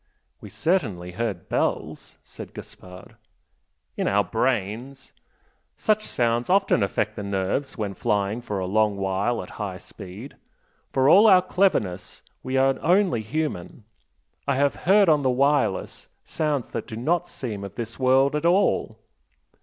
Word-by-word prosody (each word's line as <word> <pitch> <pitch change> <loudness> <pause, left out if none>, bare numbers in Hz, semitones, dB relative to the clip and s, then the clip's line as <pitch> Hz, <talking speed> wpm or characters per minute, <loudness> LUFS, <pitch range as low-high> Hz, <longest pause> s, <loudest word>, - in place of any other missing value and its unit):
"We - - -11
certainly 110 - -1
heard 100 -2 -4
bells" - - -2
said - - -11
Gaspard. 90 0 -12 0.8
"In - - -1
our 100 +1 +3
brains! 120 +5 -2 0.6
Such 215 0 +1
sounds 120 +2 0
often 195 - +3
affect 105 +2 -1
the - - -5
nerves 100 +8 -2
when 105 -3 -3
flying 100 +4 -1
for 105 -4 -4
a 95 - -2
long 105 +1 +1
while 95 +5 -1
at - - -12
high 95 -3 -4
speed. 100 +9 -11 0.6
For 130 0 +2
all 200 +8 +7
our 185 -3 +6
cleverness 180 - 0 0.2
we 130 +1 -2
are 135 0 +2
only 180 - +2
human. 115 - -4 0.6
I 140 - +2
have 140 +1 +2 0.2
heard 200 0 +6
on 150 -3 +4
the 130 - +1
'wireless,' 140 -5 0 0.2
sounds 150 -5 -2
that - - -5
do 110 - -7
not 165 +9 0
seem 105 -6 -6
of 100 0 -8
this 115 +1 -6
world 135 +2 +3
at 150 - -2
all." 180 +4 +2
120 Hz, 145 wpm, -24 LUFS, 100-150 Hz, 0.8 s, all